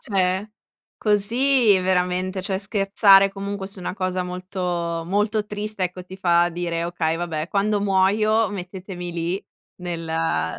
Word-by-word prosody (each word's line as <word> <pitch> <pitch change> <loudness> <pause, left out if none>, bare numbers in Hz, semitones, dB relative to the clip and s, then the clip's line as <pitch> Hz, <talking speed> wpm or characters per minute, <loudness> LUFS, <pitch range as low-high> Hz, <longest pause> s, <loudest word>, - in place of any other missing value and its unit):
cioè, 190 0 0 0.5
così 225 +1 +4
veramente 185 +1 0
cioè, 190 0 -2
scherzare 195 -1 +4
comunque 200 0 -5
su 195 0 -11
una 180 0 -4
cosa 185 -1 -2
molto 180 -2 -3
molto 210 +3 0
triste, 210 -1 -3
ecco, 180 0 -5
ti 185 +1 -10
fa 175 -2 +3
dire: 170 -1 -2
"Okay, 165 -2 -1
vabbè, 165 -2 -3
quando 205 +1 +1
muoio 210 +3 +2
mettetemi 180 -2 -7
lì 170 +3 -3 0.3
nella 165 - -2
185 Hz, 130 wpm, -23 LUFS, 175-200 Hz, 0.5 s, così